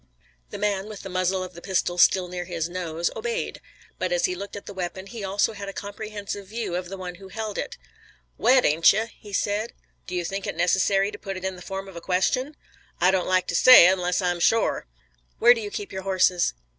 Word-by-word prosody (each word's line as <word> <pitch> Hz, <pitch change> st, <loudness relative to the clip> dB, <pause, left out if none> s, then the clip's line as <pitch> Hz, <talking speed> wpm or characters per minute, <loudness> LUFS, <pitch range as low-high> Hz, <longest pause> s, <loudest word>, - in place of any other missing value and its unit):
The -, -, -6 dB
man 200 Hz, -1 st, -1 dB
with 215 Hz, -2 st, -8 dB
the 195 Hz, -, -7 dB
muzzle 185 Hz, +1 st, 0 dB
of 185 Hz, 0 st, -8 dB
the 170 Hz, -, -11 dB
pistol 180 Hz, -2 st, -1 dB
still 185 Hz, +1 st, +5 dB
near 180 Hz, 0 st, -5 dB
his 170 Hz, -2 st, -3 dB
nose, 170 Hz, -2 st, -3 dB
obeyed. 470 Hz, +1 st, -3 dB, 0.4 s
But -, -, -1 dB
as -, -, +2 dB
he 365 Hz, -, 0 dB
looked 200 Hz, -, -7 dB
at 205 Hz, -, -8 dB
the 200 Hz, -, -8 dB
weapon 190 Hz, 0 st, -5 dB
he 220 Hz, +1 st, -8 dB
also 200 Hz, +3 st, +1 dB
had 200 Hz, -1 st, -7 dB
a -, -, -7 dB
comprehensive 205 Hz, 0 st, -6 dB
view 220 Hz, -4 st, -4 dB
of 180 Hz, 0 st, -4 dB
the 195 Hz, -, -6 dB
one 180 Hz, -1 st, -6 dB
who 195 Hz, -, -10 dB
held 215 Hz, +1 st, -5 dB
it. -, -, -5 dB, 0.6 s
"Wet 255 Hz, 0 st, +4 dB
ain't 160 Hz, +5 st, +5 dB
you?" 215 Hz, +3 st, 0 dB
he 205 Hz, -, -12 dB
said. 205 Hz, +3 st, -1 dB, 0.3 s
"Do 180 Hz, -, -5 dB
you 175 Hz, -1 st, -1 dB
think 195 Hz, +2 st, -4 dB
it -, -, -4 dB
necessary 195 Hz, +3 st, +2 dB
to -, -, -9 dB
put 195 Hz, -2 st, -5 dB
it 185 Hz, -, -6 dB
in 190 Hz, 0 st, -2 dB
the 180 Hz, -, -12 dB
form 195 Hz, +1 st, -6 dB
of 190 Hz, -, -12 dB
a 170 Hz, -, -7 dB
question?" 190 Hz, -, 0 dB, 0.4 s
"I 180 Hz, +2 st, +5 dB
don't 185 Hz, -2 st, 0 dB
like 185 Hz, 0 st, +2 dB
to 170 Hz, -, -1 dB
say, 255 Hz, -1 st, +9 dB
unless 180 Hz, 0 st, +2 dB
I'm 175 Hz, -1 st, 0 dB
shore." 225 Hz, -, +2 dB, 0.5 s
"Where 240 Hz, +2 st, +7 dB
do 230 Hz, -, -5 dB
you 205 Hz, -, -5 dB
keep 205 Hz, -1 st, -6 dB
your 190 Hz, -, -4 dB
horses?" 185 Hz, -, +2 dB
190 Hz, 230 wpm, -25 LUFS, 180-205 Hz, 0.6 s, say